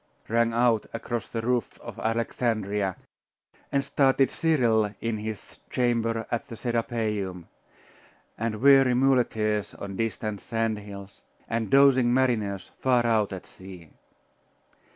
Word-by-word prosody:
rang 115 Hz, +1 st, +2 dB
out 115 Hz, -1 st, +2 dB
across 115 Hz, 0 st, -4 dB
the 115 Hz, -1 st, -4 dB
roofs 125 Hz, 0 st, -1 dB
of -, -, -10 dB
Alexandria, 110 Hz, -4 st, -1 dB, 0.8 s
and 140 Hz, 0 st, +1 dB
startled 135 Hz, -1 st, +2 dB
Cyril 115 Hz, -10 st, +2 dB
in 115 Hz, -2 st, -2 dB
his 110 Hz, -1 st, -7 dB
chamber 115 Hz, -2 st, 0 dB
at 120 Hz, +4 st, -2 dB
the 115 Hz, -, -8 dB
Serapeium, 110 Hz, -7 st, -2 dB, 0.9 s
and 110 Hz, -1 st, -3 dB
weary 135 Hz, -2 st, +6 dB
muleteers 110 Hz, -5 st, +1 dB
on 100 Hz, -1 st, -7 dB
distant 110 Hz, -2 st, -3 dB
sand 115 Hz, -2 st, -1 dB
hills, 100 Hz, -1 st, -11 dB, 0.3 s
and 115 Hz, -2 st, -2 dB
dozing 135 Hz, -2 st, +5 dB
mariners 110 Hz, -7 st, 0 dB
far 125 Hz, -2 st, +2 dB
out 110 Hz, -3 st, +2 dB
at 95 Hz, -1 st, -7 dB
sea. 90 Hz, -4 st, -13 dB
115 Hz, 120 wpm, -26 LUFS, 105-125 Hz, 0.9 s, weary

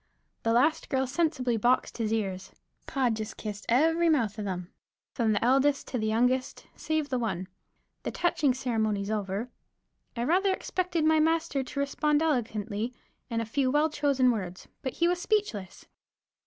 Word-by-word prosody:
The 225 Hz, -, +1 dB
last 270 Hz, +7 st, +2 dB
girl 265 Hz, -1 st, +1 dB
sensibly 260 Hz, -5 st, 0 dB
boxed 245 Hz, +2 st, +1 dB
his 220 Hz, -2 st, 0 dB
ears. 195 Hz, -4 st, -2 dB, 0.4 s
Pod 255 Hz, -4 st, +1 dB
just 215 Hz, 0 st, -6 dB
kissed 210 Hz, -1 st, -6 dB
every 325 Hz, +7 st, +4 dB
mouth 230 Hz, -9 st, +1 dB
of 210 Hz, -, -3 dB
them, 180 Hz, -1 st, -5 dB, 0.4 s
from 230 Hz, -4 st, +1 dB
the 210 Hz, +2 st, +1 dB
eldest 275 Hz, +3 st, +3 dB
to 250 Hz, -, -2 dB
the 215 Hz, -, -1 dB
youngest, 250 Hz, +4 st, +1 dB
save 315 Hz, -2 st, -1 dB
the 255 Hz, -, 0 dB
one. 190 Hz, -6 st, -2 dB, 0.5 s
The -, -, -3 dB
touching 295 Hz, -7 st, +1 dB
ceremonies 220 Hz, -5 st, -1 dB
over, 210 Hz, +3 st, -2 dB, 0.7 s
I 235 Hz, -, 0 dB
rather 375 Hz, +8 st, +3 dB
expected 350 Hz, -5 st, -1 dB
my 315 Hz, 0 st, +5 dB
master 320 Hz, -2 st, +1 dB
to 265 Hz, +2 st, -5 dB
respond 295 Hz, +2 st, +1 dB
eloquently 230 Hz, -5 st, -1 dB, 0.3 s
in 230 Hz, -1 st, -1 dB
a -, -, -3 dB
few 260 Hz, +4 st, 0 dB
well 295 Hz, +3 st, +2 dB
chosen 275 Hz, -4 st, +3 dB
words, 185 Hz, -5 st, -5 dB
but 260 Hz, -, -3 dB
he 340 Hz, -, +2 dB
was 355 Hz, 0 st, 0 dB
speechless. 380 Hz, -, -1 dB
255 Hz, 165 wpm, -28 LUFS, 220-300 Hz, 0.7 s, my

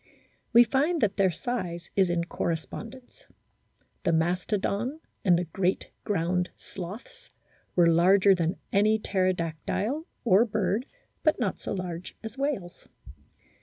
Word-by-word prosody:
We 240 Hz, 0 st, +8 dB
find 285 Hz, +9 st, +1 dB
that 205 Hz, -2 st, +1 dB
their 195 Hz, -2 st, +4 dB
size 175 Hz, -3 st, -4 dB
is 190 Hz, -2 st, +3 dB
in 175 Hz, -1 st, +1 dB
correspondence. 215 Hz, +10 st, -5 dB, 0.8 s
The -, -, +2 dB
Mastodon 200 Hz, -, 0 dB, 0.2 s
and 180 Hz, -4 st, +5 dB
the 175 Hz, -, 0 dB
great 185 Hz, +2 st, -1 dB
ground 180 Hz, -2 st, 0 dB
sloths 220 Hz, -, -9 dB, 0.5 s
were 175 Hz, -, +5 dB
larger 185 Hz, +4 st, +5 dB
than 170 Hz, -1 st, 0 dB, 0.2 s
any 215 Hz, +2 st, +4 dB
pterodactyle 185 Hz, -, -1 dB, 0.2 s
or 210 Hz, -1 st, +6 dB
bird, 215 Hz, +2 st, -1 dB, 0.3 s
but 310 Hz, -, +2 dB
not 210 Hz, -6 st, -1 dB
so -, -, -4 dB
large 180 Hz, -2 st, -5 dB
as 220 Hz, 0 st, -6 dB
whales. 270 Hz, -11 st, -3 dB
195 Hz, 125 wpm, -27 LUFS, 175-230 Hz, 0.8 s, We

